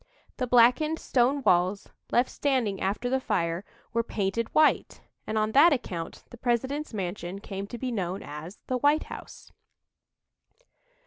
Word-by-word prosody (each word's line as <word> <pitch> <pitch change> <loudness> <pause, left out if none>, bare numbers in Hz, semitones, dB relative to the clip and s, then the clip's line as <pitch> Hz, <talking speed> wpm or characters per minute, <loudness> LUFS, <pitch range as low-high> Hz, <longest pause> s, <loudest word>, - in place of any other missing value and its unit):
The 255 - -1
blackened 250 +7 +4
stone 265 +1 +1
walls, 185 +1 +2 0.2
left 245 +1 +2
standing 250 -9 0
after 200 +6 -1
the 265 +2 +1
fire, 170 -6 -1 0.3
were 230 - +2
painted 220 0 -2
white, 310 0 +3 0.3
and 220 - -1
on 215 0 +1
that 295 +7 +7
account 175 -11 -5
the 240 - -10
President's 260 +5 -1
mansion 185 -2 -4
came 200 -1 -6
to 240 - -7
be 255 +1 -3
known 190 -4 -3
as 150 +6 -8
"the 255 -1 -1
White 290 +4 +3
House." - - -11
230 Hz, 145 wpm, -27 LUFS, 195-260 Hz, 0.3 s, that